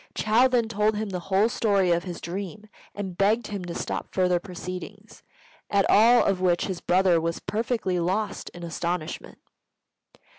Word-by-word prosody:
Chou 225 +4 +4
then 240 -3 +2
told 215 -1 +1
him 215 0 -3
the 180 - -3
whole 195 +3 +4
story 200 -6 +1
of 170 +1 +1
his 175 -2 -6
dream, 195 +4 -6 0.3
and 195 -3 -5
begged 215 +4 +2
him 200 -3 -4
to 170 - -6
stop - - -4
further 180 -2 +2
proceedings; 180 -1 -8 0.5
at 200 -1 +3
all 235 +3 +6
of 190 -2 0
which 175 -2 +2
his 185 -3 -4
brother 180 -2 +3
was 165 0 -2
perfectly 220 -4 -1
lost 195 +4 -2
in 175 - -11
astonishment. 170 -1 -4
190 Hz, 160 wpm, -25 LUFS, 180-215 Hz, 0.5 s, all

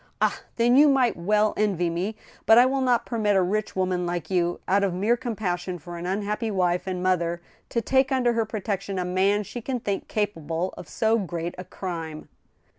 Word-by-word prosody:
Ah! - - +1
then 240 +1 +3
you 295 +2 +7
might 260 -4 +3
well 210 +5 +2
envy 195 -5 +1
me. 180 +6 -2 0.3
But 225 - +8
I 245 - +8
will 265 +1 +1
not 250 -2 +2
permit 215 -4 +1
a 190 - +4
rich 210 +3 -1
woman 185 -1 0
like 175 +1 -4
you, 175 -1 +1
out 200 +2 +3
of 190 -3 0
mere 210 +6 +2
compassion 190 -7 -3
for 175 +2 -9
an 170 +1 -5
unhappy 210 +4 -1
wife 180 -2 0
and 180 -1 -3
mother, 175 -2 +1 0.3
to 235 - 0
take 265 +4 +2
under 250 -2 +2
her 230 -1 +1
protection 200 -2 -3
a 180 - -1
man 195 +3 +2
she 240 +5 -7
can 255 +2 -3
think 200 -3 -3
capable 175 -4 -2
of - - -10
so 225 +1 +2
great 175 -3 -4
a - - -5
crime." 165 -5 -6
195 Hz, 200 wpm, -25 LUFS, 180-225 Hz, 0.3 s, But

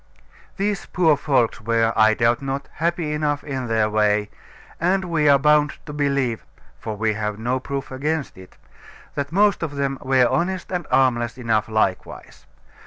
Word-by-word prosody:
These 200 -1 -2
poor 165 -4 +3
folks 130 -6 0
were, 115 +1 +1
I 110 0 +4
doubt 115 +2 +2
not, 135 0 -4
happy 170 -1 -1
enough 150 -1 -1
in 135 -4 -4
their 110 -1 +2
way; 105 -1 +1 0.5
and 185 +3 +1
we 160 -4 +2
are 140 - +7
bound 150 +1 +3
to 150 - -8
believe 140 -5 -1 0.4
(for 110 -1 -5
we 110 0 0
have 105 0 -3
no 120 +4 -1
proof 140 +1 -5
against 150 +3 -2
it), 95 0 -15 0.6
that 140 +1 -4
most 200 +2 +3
of 155 -4 -4
them 140 -1 -2
were 130 -1 +3
honest 175 +9 -2
and 180 -1 -3
harmless 120 -3 +1
enough 110 -3 0
likewise. 110 -4 -3
135 Hz, 165 wpm, -22 LUFS, 115-150 Hz, 0.6 s, are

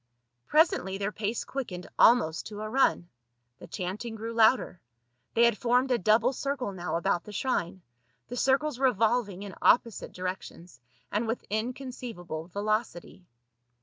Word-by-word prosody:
Presently 295 - +2
their 200 +1 -2
pace 215 +2 -2
quickened 195 -10 -5
almost 220 -10 +4
to 210 0 -7
a 215 - -4
run; 255 -8 +2 0.5
the - - -11
chanting 205 +5 -5
grew 225 +1 -5
louder; 225 -5 +3 0.5
they 230 - +5
had 235 -3 +2
formed 250 +2 +2
a 245 - +3
double 220 +6 +3
circle 270 -5 -3
now 175 -4 -4
about 170 +1 0
the 210 - -9
shrine, 190 -6 -2 0.4
the 245 - -6
circles 270 +2 +1
revolving 225 -5 +1
in 200 -2 -8
opposite 230 -2 +3
directions, 180 -5 -7 0.3
and 215 +3 0
with 225 +2 -3
inconceivable 220 -8 -5
velocity. 205 -2 -3
215 Hz, 140 wpm, -28 LUFS, 185-245 Hz, 0.5 s, they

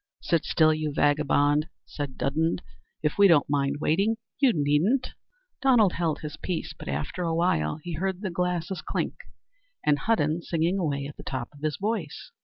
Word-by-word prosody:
"Sit 165 -3 +1
still, 155 -1 +4
you 155 -1 -2
vagabond," 145 +1 +2 0.2
said 145 -3 -6
Dudden; 160 +4 +1 0.5
"if 150 +5 0
we 200 - +8
don't 165 -6 +5
mind 140 -1 +1
waiting, 200 +9 +1 0.2
you 270 -3 +5
needn't." 165 - +1 0.5
Donald 240 -8 +5
held 165 -4 -1
his 150 -1 -6
peace, 180 -3 -4
but - - -11
after 70 - -3
a 165 -2 0
while 150 - +1
he 175 - -5
heard 190 +3 -2
the 190 -4 -3
glasses 180 +1 -2
clink, - - -2 0.7
and 145 -1 +3
Hudden 175 -6 +1
singing 170 +3 0
away 140 -5 -1
at 145 - -8
the - - -9
top 130 -3 -4
of 145 - -15
his 155 -1 -1
voice. 200 -7 -3
160 Hz, 175 wpm, -27 LUFS, 145-185 Hz, 0.7 s, we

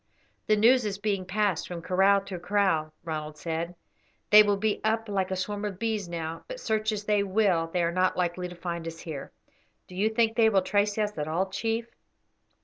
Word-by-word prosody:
"The 215 - +5
news 240 +4 +5
is 205 -2 -2
being 200 -2 -1
passed 200 -2 0
from 170 -2 -6
kraal 195 +3 +4
to 195 -2 -7
kraal," 180 -4 +1
Ronald 155 -2 -5
said; 165 +2 -4 0.6
"they 210 0 +10
will 205 -1 +2
be 215 +1 -1
up 225 +1 0
like 195 -2 -1
a 190 - -1
swarm 205 +2 -3
of 205 -3 -3
bees 215 -4 -2
now, 165 -1 -5
but - - -7
search 220 - 0
as 210 -1 -3
they 210 -1 +2
will 190 -4 +2
they 175 +1 -1
are 170 - +1
not 185 +1 +1
likely 180 0 -1
to 180 - -10
find 170 -1 -5
us 165 0 -7
here. 155 -5 -7 0.6
Do - - -13
you 200 +4 +1
think 225 0 +1
they 225 -2 +5
will 195 -3 +2
trace 205 +2 +1
us 210 -1 -1
at 150 - -2
all, 185 +4 -1
chief?" 225 +3 -1
195 Hz, 210 wpm, -27 LUFS, 175-210 Hz, 0.6 s, they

